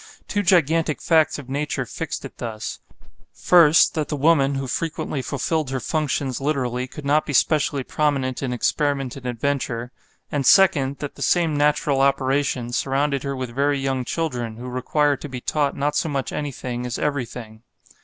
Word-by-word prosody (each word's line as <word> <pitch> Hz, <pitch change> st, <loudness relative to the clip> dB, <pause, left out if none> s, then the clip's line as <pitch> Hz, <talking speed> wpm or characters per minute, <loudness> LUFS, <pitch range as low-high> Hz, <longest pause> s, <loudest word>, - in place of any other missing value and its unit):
Two 205 Hz, -, 0 dB
gigantic 165 Hz, -4 st, +2 dB
facts 160 Hz, -2 st, +3 dB
of 145 Hz, -4 st, -9 dB
nature 140 Hz, -1 st, -2 dB
fixed 155 Hz, +2 st, -5 dB
it 135 Hz, -, -11 dB
thus: 110 Hz, -2 st, -5 dB, 0.5 s
first, 165 Hz, -3 st, +5 dB
that 155 Hz, -3 st, -2 dB
the 150 Hz, -, -2 dB
woman 140 Hz, -2 st, +3 dB
who 135 Hz, 0 st, -2 dB
frequently 155 Hz, 0 st, -3 dB
fulfilled 145 Hz, +3 st, -2 dB
her 135 Hz, 0 st, -2 dB
functions 140 Hz, -2 st, -2 dB
literally 130 Hz, -3 st, -1 dB
could 145 Hz, +2 st, -10 dB
not 150 Hz, +2 st, +3 dB
be 145 Hz, -, -5 dB
specially 145 Hz, 0 st, +2 dB
prominent 135 Hz, -3 st, -1 dB
in 135 Hz, -2 st, -2 dB
experiment 135 Hz, +1 st, 0 dB
and 130 Hz, -2 st, -7 dB
adventure; 125 Hz, -1 st, -2 dB, 0.4 s
and 145 Hz, -2 st, 0 dB
second, 140 Hz, -8 st, +5 dB
that 145 Hz, -, -6 dB
the -, -, -13 dB
same 170 Hz, -4 st, +2 dB
natural 145 Hz, -1 st, +2 dB
operation 135 Hz, -2 st, +1 dB
surrounded 140 Hz, +2 st, 0 dB
her 140 Hz, 0 st, -3 dB
with 130 Hz, -2 st, -5 dB
very 140 Hz, +2 st, +1 dB
young 135 Hz, -1 st, -1 dB
children, 125 Hz, -7 st, -3 dB
who 125 Hz, +2 st, -7 dB
require 145 Hz, +4 st, +1 dB
to 145 Hz, +2 st, -8 dB
be 130 Hz, -1 st, -5 dB
taught 145 Hz, +2 st, -1 dB
not 145 Hz, +1 st, 0 dB
so 160 Hz, -, 0 dB
much 140 Hz, -3 st, -2 dB
anything 125 Hz, -4 st, -4 dB
as 125 Hz, -2 st, -3 dB
everything. 120 Hz, -6 st, -4 dB
140 Hz, 170 wpm, -22 LUFS, 130-150 Hz, 0.5 s, first